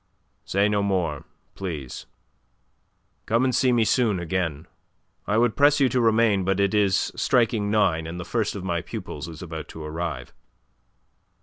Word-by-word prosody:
"Say 100 +2 +2
no 105 -1 +1
more, 90 -7 -1 0.3
please. 80 -10 -6 1.2
Come 115 +3 +2
and 130 -1 +1
see 130 +1 +3
me 120 -2 +3
soon 110 -5 +2
again. 80 -3 -2 0.6
I 105 - +1
would 120 -1 +2
press 145 0 +4
you 135 -2 +4
to 125 - +1
remain, 110 -3 +3
but 95 +1 0
it 100 0 +2
is 100 -3 +2
striking 115 -4 +1
nine, 90 -7 +1
and 85 +2 -6
the 90 - -6
first 110 -3 -1
of 100 - -6
my 85 -2 -1
pupils 80 - -7
is 80 +1 -9
about 80 -2 -7
to 80 - -9
arrive." 80 +2 -5
100 Hz, 165 wpm, -24 LUFS, 85-115 Hz, 1.2 s, press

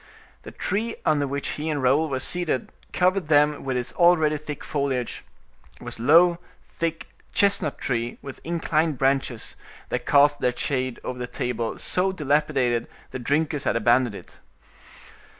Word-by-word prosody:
The - - -10
tree 225 +3 -2
under 145 -2 +2
which 140 +1 -3
he 155 +2 -3
and 150 -2 -1
Raoul 140 +5 +2
were 130 -2 -2
seated 160 -2 -1 0.2
covered 185 -2 +1
them 150 -1 +3
with 130 -2 -1
its 125 -1 -4
already 165 -3 +4
thick 150 -1 -7
foliage; 135 -4 -2 0.6
it - - -13
was - - -7
a - - -6
low, 170 +6 +5 0.3
thick 165 -1 -3 0.3
chestnut 200 -7 +2
tree, 120 -2 -2
with 140 - -10
inclined 160 -2 0
branches, 135 -3 -1 0.3
that 125 - -3
cast 145 0 +5
their 125 -1 0
shade 130 -2 -2
over 125 0 -5
a 125 - -3
table 120 -2 -3
so 185 +1 +1
dilapidated 145 -7 0 0.2
the 130 - -5
drinkers 145 +3 0
had - - +1
abandoned 120 0 +2
it. - - -12
145 Hz, 155 wpm, -24 LUFS, 125-160 Hz, 0.6 s, low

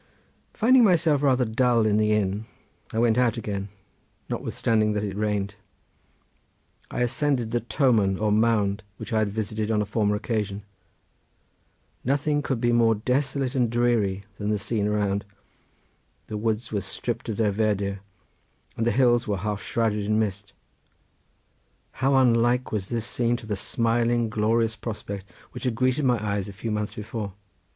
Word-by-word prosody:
Finding 250 +3 +5
myself 165 -7 +4
rather 130 -3 +3
dull 115 0 +2
in 105 -1 +3
the 110 0 +2
inn 105 +1 0 0.4
I - - -4
went 115 0 +3
out 120 -2 +2
again 100 -3 -4 0.6
notwithstanding 110 -2 0
that 105 0 -1
it 100 -2 -3
rained. 105 -1 -1 1.4
I - - -3
ascended 125 -2 0
the 120 - +1
toman 115 -6 +2
or 105 0 +1
mound 105 -2 +2 0.2
which 120 - -7
I 110 - +3
had 110 -1 +1
visited 110 +1 -3
on 110 -2 +2
a 105 - +1
former 105 0 +1
occasion. 105 -2 -2 1.4
Nothing 145 +3 +1
could 135 -4 -2
be 120 +1 +2
more 115 -1 +4
desolate 130 +3 -1
and 125 -4 +2
dreary 115 -5 +1 0.2
than 105 0 -2
the 105 - +1
scene 105 0 -1
around. 100 -1 0 1.0
The 105 - -5
woods 110 +1 -2
were 105 -2 -1
stript 115 +5 -4
of 105 - -3
their 110 -2 +2
verdure 100 -2 0 0.8
and 115 - -1
the - - +3
hills 120 -2 +3
were 100 -2 0
half 105 +1 -3
shrouded 110 -3 0
in 110 +1 +1
mist. 100 -2 -2 1.5
How 135 +1 +3
unlike 125 -1 +3
was 100 -3 -3
this 115 -2 -2
scene 120 0 0
to 115 - -11
the 105 -1 -2
smiling, 115 +2 +1
glorious 110 +1 +1
prospect 100 -3 -6 0.2
which 125 - -8
had 125 -3 0
greeted 130 +4 +1
my 125 -2 +3
eyes 100 -1 -1
a - - -8
few 110 +3 -4
months 105 0 -2
before. 105 -1 -5
110 Hz, 160 wpm, -25 LUFS, 105-120 Hz, 1.5 s, Finding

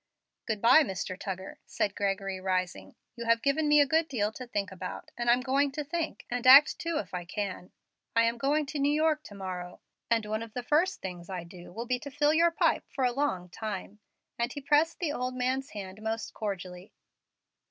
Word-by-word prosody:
"Good 220 -2 -2
by, 255 +7 +8
Mr. 190 - -3
Tuggar," 190 0 -6
said 200 - -1
Gregory, 195 -1 -2
rising; 185 -1 -2 0.2
"you 235 -1 -6
have 230 0 +3
given 295 +2 +2
me 295 0 +6
a 290 - +6
good 320 +3 +2
deal 215 -7 -1
to 250 +3 -8
think 205 -5 -2
about, 190 - -7
and 240 0 -1
I'm 245 +1 +5
going 275 +2 +1
to 300 +1 -3
think, 320 +2 -4
and 245 +1 -1
act, 275 +4 +9
too, 335 -1 -1
if 300 - -5
I 180 -1 -3
can. 185 0 -5 0.4
I 230 - +5
am 230 +1 +1
going 290 +4 +1
to 280 +1 -5
New 280 +1 +3
York 305 0 +2
to 205 - -10
morrow, 180 -2 -6 0.3
and 230 -2 +2
one 215 +1 -2
of 230 -1 -8
the 250 - -3
first 320 +8 +1
things 180 -2 -6
I 185 -3 -4
do 175 +1 -12
will 230 +6 -5
be 250 0 0
to 285 - -7
fill 290 +2 +2
your 335 +2 +5
pipe 330 - +1
for 270 - -3
a 250 - +3
long 190 -10 -1
time;" 210 0 -6 0.4
and 235 +1 0
he 290 - -5
pressed 300 +4 +2
the 315 -5 -1
old 255 -1 -3
man's 260 +2 -1
hand 195 0 -8
most 220 +1 -3
cordially. 185 -3 -6
235 Hz, 215 wpm, -29 LUFS, 195-285 Hz, 0.4 s, act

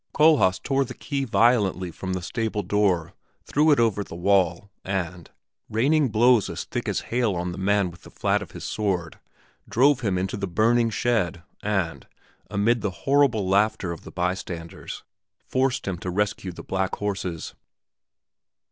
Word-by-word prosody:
Kohlhaas 150 -12 +5
tore 140 -1 0
the 125 -1 -8
key 140 -2 -3
violently 105 -7 +2
from 95 +2 -5
the 90 -1 -3
stable 110 0 -2
door, 95 -6 +1 0.3
threw 150 +2 +3
it 145 - +5
over 110 -3 +2
the 85 - -10
wall, 95 +1 +1
and, 90 -3 -3 0.4
raining 140 +5 +2
blows 115 0 +4
as - - -4
thick - - -4
as - - -1
hail 120 -5 +2
on 90 +1 -2
the 90 - -7
man 100 -1 +2
with 85 - -16
the - - -13
flat - - 0
of - - -8
his - - -9
sword, 95 -6 -2 0.5
drove 135 +3 +4
him 100 -7 0
into 95 +2 -2
the 100 - -3
burning 115 +5 +3
shed 105 -7 0 0.2
and, 90 -10 -2 0.4
amid 110 +4 +2
the 105 - 0 0.2
horrible 135 -8 +3
laughter 100 -2 +2
of 85 - -7
the - - -10
bystanders, 90 -2 -4 0.4
forced 130 -3 0
him 90 -3 -2
to 90 - -4
rescue 100 0 -1
the 85 - -10
black 95 0 -1
horses. 95 -5 -4
100 Hz, 165 wpm, -25 LUFS, 90-120 Hz, 0.5 s, Kohlhaas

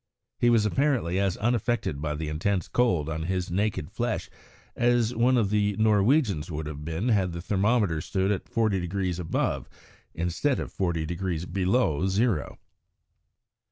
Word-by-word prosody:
He 120 - +4
was 115 -3 +4
apparently 120 - +1
as 100 -2 0
unaffected 110 - 0
by 75 -1 -2
the 80 +1 -4
intense 90 +5 -1
cold 90 -12 +1
on 80 0 -3
his 90 0 -2
naked 100 -5 -1
flesh - - -2 0.4
as 120 -1 +2
one 125 +2 +3
of 105 -4 +1
the 105 -1 +1
Norwegians 110 - +2
would 80 -1 -4
have 75 -1 -6
been 80 +9 -2
had 95 -6 +2
the 85 - -5
thermometer 100 -3 +1
stood 95 +3 0
at 100 - -3
forty 110 -4 +1
degrees 90 0 -2
above 85 -2 -1 0.5
instead 90 - 0
of - - -5
forty 85 -4 -1
degrees 85 0 -3
below 95 - +1
zero. 105 +3 0
95 Hz, 155 wpm, -27 LUFS, 85-110 Hz, 0.5 s, He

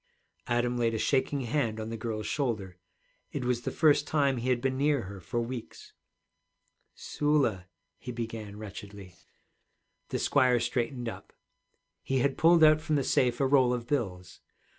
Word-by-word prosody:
Adam 120 0 0
laid 115 -1 +1
a - - 0
shaking 135 +4 +1
hand 120 -3 -1
on 110 0 -5
the 115 - -4
girl's 110 -1 -4
shoulder. 105 -10 -2 0.5
It 135 -3 -4
was 125 -1 0
the - - -3
first 145 -2 +3
time 140 -4 +2
he 120 +2 -2
had 125 -1 +2
been 130 +1 -1
near 140 -2 +1
her 95 +1 -8
for 95 +7 -3
weeks. 120 0 -7 1.0
'Sula,' 140 -11 0 0.3
he 125 - -6
began 115 -3 -6
wretchedly. 100 -2 -9 1.0
The - - -1
squire 130 -3 +3
straightened 120 +1 -2
up. 115 - -8 0.7
He 135 - -1
had 135 +2 +1
pulled 165 0 +5
out 155 0 +6
from 155 -1 -1
the 140 - +1
safe 125 -1 +1
a 135 - +2
roll 130 -2 +4
of 120 -1 -6
bills. 95 -10 -3
120 Hz, 160 wpm, -29 LUFS, 110-140 Hz, 1.0 s, out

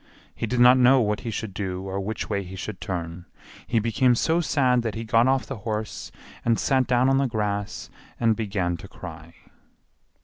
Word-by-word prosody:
He 115 - -4
did 125 +3 -1
not 125 +1 +7
know 130 +2 +6
what 105 -3 0
he 115 - -5
should 110 -2 -4
do 95 -1 -4
or 95 0 -4
which 105 +3 -4
way 100 -2 -1
he 95 0 -9
should 95 0 -6
turn; 85 -1 -5 0.4
he 120 - 0
became 115 +3 +3
so 160 +8 +1
sad 130 -6 +2
that 115 -2 -3
he 115 - -4
got 115 +2 +3
off 130 -4 +2
the 135 - -6
horse 110 0 -4 0.3
and 115 -1 +2
sat 130 -2 +2
down 125 +1 +3
on 135 0 +3
the 135 - +2
grass 105 -3 -3 0.3
and 115 -1 +3
began 95 -6 -2
to 95 - -11
cry. 85 -3 -10
110 Hz, 200 wpm, -25 LUFS, 95-125 Hz, 0.4 s, not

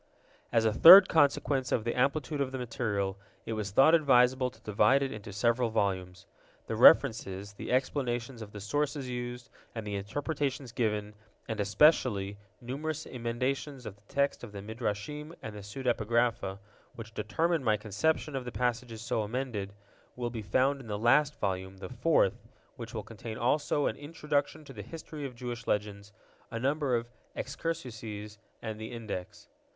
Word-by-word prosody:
As 115 -1 +3
a 110 - +3
third 185 - +11
consequence 140 -4 +2
of 110 - +1
the 120 - -1
amplitude 140 +3 0
of 135 -2 -1
the 130 - -4
material, 105 -5 -2 0.3
it 115 - -3
was 105 -2 -3
thought 135 - +5
advisable 130 -4 +4
to 130 - -20
divide 105 +6 +3
it 135 - -2
into 105 -1 -8
several 115 +3 +1
volumes. 95 -4 -2 0.4
The 110 - -3
references, 110 -6 +5
the - - -6
explanations 125 -2 -1
of 105 -2 -8
the 105 - -8
sources 145 +5 -1
used, 120 0 -5 0.2
and 110 -2 -5
the 105 - -4
interpretations 135 +5 -3
given, 105 -3 -1 0.3
and, 110 -2 -4
especially, 100 -3 +3 0.2
numerous 150 +5 -4
emendations 125 +2 -3
of 105 - -7
the 100 - -27
text 140 -2 0
of 115 - -8
the 100 -1 -7
Midrashim 120 +8 -4
and 110 -1 -6
the 105 - -7
pseudepigrapha, 115 -2 0 0.4
which 110 -1 -9
determined 155 +10 0
my 110 -3 +3
conception 140 +8 -1
of 130 - -2
the 125 - -6
passages 120 -2 -2
so 115 -2 -1
emended, 110 -3 -3 0.5
will 120 -1 -3
be 115 -2 -5
found 130 +7 +1
in 120 - -12
the 105 -1 -3
last 135 +7 +3
volume, 95 -1 -2
the 95 - -8
fourth, 125 - +2 0.3
which 115 0 -8
will 110 - -3
contain 110 +1 -8
also 145 +3 +1
an - - 0
Introduction 150 0 -2
to - - -11
the 105 - -7
History 150 - -7
of 125 - -12
Jewish 120 -1 -6
Legends, 100 -1 -2 0.4
a 115 - -5
number 140 0 +1
of 115 0 -2 0.3
Excursuses, 110 -10 -5 0.2
and 110 -1 -5
the 110 - -6
Index. 105 -6 -7
120 Hz, 165 wpm, -30 LUFS, 105-135 Hz, 0.5 s, third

